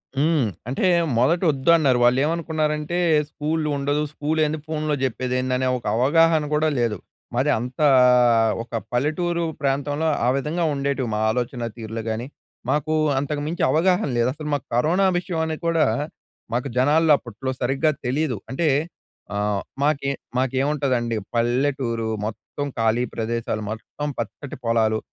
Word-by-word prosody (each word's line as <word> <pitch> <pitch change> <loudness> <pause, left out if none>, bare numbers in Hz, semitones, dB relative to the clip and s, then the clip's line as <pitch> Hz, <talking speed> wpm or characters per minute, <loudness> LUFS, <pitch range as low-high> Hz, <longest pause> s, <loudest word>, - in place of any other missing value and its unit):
హ్మ్. 150 0 +2 0.3
అంటే 135 - 0 0.3
మొదటోద్దు 160 +1 +3
అన్నారు. 130 -6 +3
వాళ్ళేమనుకున్నారంటే 150 +4 0 0.3
"స్కూలుండదు, 150 -2 -1
స్కూల్ 155 +1 -1
ఏంది? 150 +1 -2
ఫోన్‌లో 155 -1 -1
చెప్పేది 125 0 -1
ఏంది?" 130 0 -1
అనే 130 0 0
ఒక 120 - -12
అవగాహన 160 +5 +4
కూడా 155 +1 +2
లేదు. 115 -3 0 0.4
మాది 135 +4 +2
అంతా 125 +5 0 0.8
ఒక 115 - -20 0.2
పల్లెటూరు 170 +7 0 0.2
ప్రాంతంలో 145 +3 0 0.2
ఆ - - +2
విధంగా 155 +5 -1
ఉండేటివి 140 -3 -1
మా - - -1
ఆలోచన 120 0 -2
తీరు‌లు 110 0 -5
కానీ, 115 +3 -3 0.4
మాకు 150 +1 0 0.3
అంతకు 145 +1 -3
మించి 165 +2 -2
అవగాహన 180 +2 +2
లేదు. 120 +1 +2
అసలు 150 +1 -7
మాకు 140 -4 -2
కరోనా 175 +10 +3
విషయం 175 -2 -2
అని 160 -1 -3
కూడా 165 -1 +3 0.7
మాకు 125 +3 -1
జనాల్లో 155 +5 +4
అప్పట్లో 125 +2 -5
సరిగ్గా 135 +5 +2
తెలీదు. 130 -1 0
అంటే 160 +5 0 0.7
ఆహ్, 105 -1 0 0.2
మాకే 140 -1 +1 0.3
మాకేముంటదండి 130 -2 0 0.2
పల్లెటూరు, 120 -1 0 0.2
మొత్తం 130 +6 -5
ఖాళీ 115 +1 +2
ప్రదేశాలు, 115 -1 -2
మొత్తం 130 +7 -5
పచ్చటి 130 +4 -6
పొలాలు, 110 -1 +2
140 Hz, 130 wpm, -23 LUFS, 120-155 Hz, 0.8 s, అవగాహన